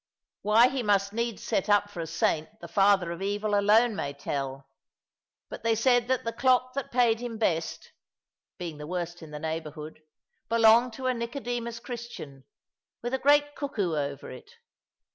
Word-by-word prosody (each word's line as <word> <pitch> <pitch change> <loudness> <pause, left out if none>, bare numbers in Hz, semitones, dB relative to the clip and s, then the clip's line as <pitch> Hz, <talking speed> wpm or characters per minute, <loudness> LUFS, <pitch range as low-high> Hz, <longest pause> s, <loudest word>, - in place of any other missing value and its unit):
Why 220 +4 +5
he 270 -1 -2
must 200 -2 +1
needs 230 -1 -2
set 210 -2 -1
up 205 0 +4
for 175 - -8
a 165 - -3
saint 160 +4 -1
the - - -9
father 195 -3 +3
of 170 +2 -6
evil 205 +2 -1
alone 210 +3 +4
may 140 -6 -3
tell; 135 -1 -4 0.8
but - - -8
they 230 0 +2
said 245 +1 +3
that 260 -1 0
the 230 - -3
clock 255 -1 +2
that 275 -1 -4
paid 240 -2 +3
him 240 -2 -5
best 170 -7 -1 0.7
(being 165 -5 -6
the 150 - -7
worst 175 0 -4
in 160 - -10
the 150 - -7
neighbourhood) 155 0 -6 0.5
belonged 230 +1 +5
to 260 +2 -7
a 255 - +2
Nicodemus 235 -1 -4
Christian, 230 - -8 0.6
with 240 +2 -3
a 265 - +1
great 290 +1 +4
cuckoo 205 - -2
over 140 -2 -4
it. 130 - -11
210 Hz, 170 wpm, -28 LUFS, 165-240 Hz, 0.8 s, Why